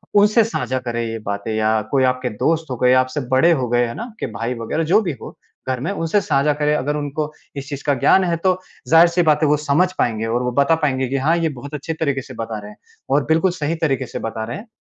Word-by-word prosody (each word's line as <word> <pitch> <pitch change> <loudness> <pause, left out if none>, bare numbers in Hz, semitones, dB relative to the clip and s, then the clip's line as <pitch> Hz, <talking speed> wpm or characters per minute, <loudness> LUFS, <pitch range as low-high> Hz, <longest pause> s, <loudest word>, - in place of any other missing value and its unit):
उनसे 210 +3 +5
साझा 130 - -2
करें 120 -2 -3
ये 115 0 -4
बातें 100 +2 -3
या 110 0 +2
कोई 135 -2 +3
आपके 125 0 0
दोस्त 160 +9 0
हो - - -1
गए, 125 +1 +4
आपसे 130 +3 +1
बड़े 130 +6 +4
हो 130 -7 +1
गए, 120 0 +2
है 115 - -5
ना? - - -5
आप 235 -2 -10
के - - -2
भाई 115 +3 -3
वगैरह 115 +8 -2
जो 205 - +6
भी 180 -6 -2
हो - - -9 0.4
घर 130 -1 -1
में, 160 +10 -2
उनसे 200 +1 0
साझा 140 -1 +1
करें। 150 0 0
अगर 145 +1 -1
उनको 150 +1 -3 0.2
इस 140 0 -6
चीज़ 140 -2 -6
का 145 - +3
ज्ञान 190 - +5
है, 175 -2 0
तो 185 +2 +1 0.3
ज़ाहिर-सी 170 +2 +5
बात 150 0 +3
है - - +4
वो 150 - +4
समझ 150 +5 +1
पाएँगे 115 -2 0
और 120 +2 -1
वो 125 - -1
बता 140 +4 +4
पाएँगे 130 -3 +1
कि, 135 - 0
"हाँ, 150 +5 +2
ये 165 -1 0
बहुत 140 +1 -9
अच्छे 150 +2 -4
तरीक़े 140 -4 -1
से 130 - -11
बता 115 -2 -5
रहे 105 0 -10
हैं - - -17 0.3
और 140 +2 +3
बिल्कुल 165 +4 +3
सही 165 -2 -2
तरीक़े 135 -4 +1
से - - -6
बता 115 0 -4
रहे 120 - -5
हैं 220 - -11
140 Hz, 265 wpm, -20 LUFS, 125-165 Hz, 0.4 s, जो